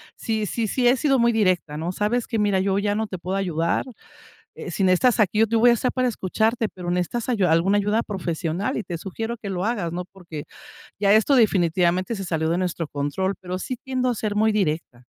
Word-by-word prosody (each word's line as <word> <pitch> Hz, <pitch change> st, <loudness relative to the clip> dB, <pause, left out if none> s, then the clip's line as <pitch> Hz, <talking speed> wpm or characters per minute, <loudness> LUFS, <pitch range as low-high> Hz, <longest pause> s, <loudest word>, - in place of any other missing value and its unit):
sí, 220 Hz, -2 st, -2 dB
sí, 225 Hz, +3 st, -2 dB
sí 245 Hz, +4 st, +1 dB
he 245 Hz, -, +5 dB
sido 270 Hz, 0 st, +2 dB
muy 235 Hz, 0 st, +4 dB
directa, 185 Hz, -8 st, +1 dB
¿no? 165 Hz, +3 st, -2 dB
Sabes 215 Hz, +5 st, -1 dB
que 225 Hz, -, -2 dB
mira, 205 Hz, -2 st, +2 dB
yo 195 Hz, +1 st, +1 dB
ya 205 Hz, 0 st, 0 dB
no 220 Hz, +1 st, -1 dB
te 190 Hz, -, -6 dB
puedo 180 Hz, +2 st, -4 dB
ayudar, 170 Hz, -4 st, 0 dB, 0.7 s
eh, -, -, -7 dB
si -, -, -2 dB
necesitas 185 Hz, +7 st, +3 dB
aquí, 210 Hz, 0 st, +2 dB
yo 225 Hz, -, +5 dB
te 230 Hz, +1 st, 0 dB
voy 240 Hz, +2 st, +6 dB
a -, -, +6 dB
estar 240 Hz, +2 st, 0 dB
para 255 Hz, -1 st, +1 dB
escucharte, 225 Hz, +2 st, 0 dB
pero 180 Hz, -3 st, -6 dB
necesitas 180 Hz, +7 st, -2 dB
ayuda, 195 Hz, -8 st, +2 dB
alguna 185 Hz, +5 st, +3 dB
ayuda 210 Hz, +3 st, +1 dB
profesional 180 Hz, -, -3 dB
y -, -, -2 dB
te 175 Hz, -5 st, -5 dB
sugiero 225 Hz, +6 st, -5 dB
que 210 Hz, -, -7 dB
lo 185 Hz, -1 st, -2 dB
hagas, 205 Hz, -7 st, -1 dB
¿no? 180 Hz, +1 st, -4 dB
Porque 170 Hz, -6 st, -8 dB, 0.6 s
ya 200 Hz, -1 st, +3 dB
esto 220 Hz, +6 st, +4 dB
definitivamente 185 Hz, -2 st, +2 dB
se 195 Hz, -, -5 dB
salió 160 Hz, -3 st, -1 dB
de 170 Hz, -, +1 dB
nuestro 175 Hz, -3 st, -2 dB
control, 145 Hz, +8 st, -2 dB
pero 185 Hz, 0 st, -4 dB
sí 255 Hz, -, -4 dB
tiendo 255 Hz, -2 st, -1 dB
a 245 Hz, -, 0 dB
ser 210 Hz, -1 st, -3 dB
muy 220 Hz, +1 st, +3 dB
directa, 155 Hz, -10 st, -2 dB
200 Hz, 225 wpm, -23 LUFS, 175-225 Hz, 0.7 s, voy